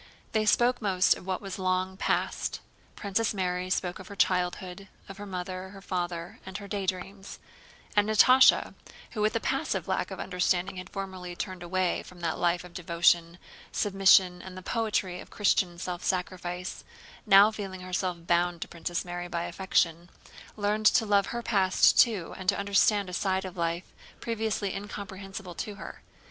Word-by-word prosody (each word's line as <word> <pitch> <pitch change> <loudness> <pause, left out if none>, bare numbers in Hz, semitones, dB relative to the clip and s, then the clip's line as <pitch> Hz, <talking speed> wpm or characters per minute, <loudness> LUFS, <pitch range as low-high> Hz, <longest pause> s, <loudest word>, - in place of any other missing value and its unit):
They 215 -1 +1
spoke 245 +3 +3
most 190 -3 +3
of 180 - -12
what 190 +1 -2
was 195 -1 -6
long 185 0 0
past. - - -1 0.4
Princess 210 +2 -1
Mary 180 -1 -1
spoke 180 -1 -1
of 190 - -10
her 200 - -9
childhood, 180 +1 0 0.2
of 195 - -10
her 205 - -7
mother, 185 0 -5
her 195 0 -11
father, 175 -3 -4
and 190 0 -6
her 200 - -9
daydreams; 195 0 -4 0.6
and 205 0 +3
Natásha, 255 +5 +6 0.4
who 215 - -4
with 215 +2 +1
a - - +2
passive - - -1
lack - - -1
of - - -7
understanding 185 0 0
had 185 - -7
formerly 185 -2 -6
turned 185 0 -5
away 180 +1 0
from 180 -1 -14
that 165 -1 -2
life 175 0 +1
of 180 -1 -13
devotion, 170 -1 +2 0.3
submission, 190 -2 +4
and 185 -1 -10
the 185 - -8
poetry 210 -5 -1
of - - -11
Christian 185 -4 +1
self 175 0 -5
sacrifice, 180 0 -3 0.4
now 200 +1 +8
feeling 195 -4 -6
herself 180 -2 -3
bound 175 0 +1
to - - -13
Princess 170 +1 -4
Mary 175 0 -5
by 170 -1 -3
affection, 170 -1 0 0.5
learned 210 +1 +2
to 225 - +4
love 200 -2 +3
her 235 0 -4
past 190 -5 +4
too 210 -8 +3
and 185 0 -1
to - - +2
understand 200 0 +2
a 180 - -8
side 190 +1 0
of 185 -1 -7
life 170 0 -3 0.3
previously 220 -3 -2
incomprehensible 195 -2 -7
to 205 +4 -5
her. - - -9
185 Hz, 170 wpm, -28 LUFS, 180-200 Hz, 0.6 s, now